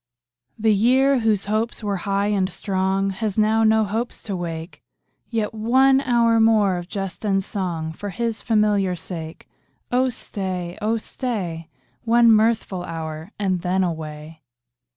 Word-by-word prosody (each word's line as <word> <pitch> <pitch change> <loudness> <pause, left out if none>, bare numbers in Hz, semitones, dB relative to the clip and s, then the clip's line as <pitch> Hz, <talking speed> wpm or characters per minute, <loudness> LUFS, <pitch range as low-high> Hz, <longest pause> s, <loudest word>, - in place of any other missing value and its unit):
The 220 0 +3
year, 260 +6 +4
whose 220 -4 +1
hopes 215 +3 -1
were 200 -1 -1
high 200 +1 +1
and 195 -3 +1
strong, 195 +1 -1
Has 200 +1 -3
now 220 +1 +3
no 220 0 +4
hopes 225 +4 -3
to 200 -4 -4
wake; 165 -1 -6 0.5
Yet 225 -3 -2
one 260 +5 +4
hour 235 -3 +3
more 215 -4 +4
of 175 0 -6
jest 195 -1 -5
and 195 -2 +1
song 170 -6 -3
For 205 +5 -6
his 230 +3 -3
familiar 210 -4 +2
sake. 165 -2 -8 0.4
Oh 255 +1 +2
stay, 185 -6 -4
oh 220 +2 +1
stay, 185 -9 -4 0.3
One 235 0 +5
mirthful 215 -4 +2
hour, 160 0 -6
and 190 -3 0
then 185 +1 +1
away. 160 -2 -5
205 Hz, 145 wpm, -22 LUFS, 180-225 Hz, 0.5 s, One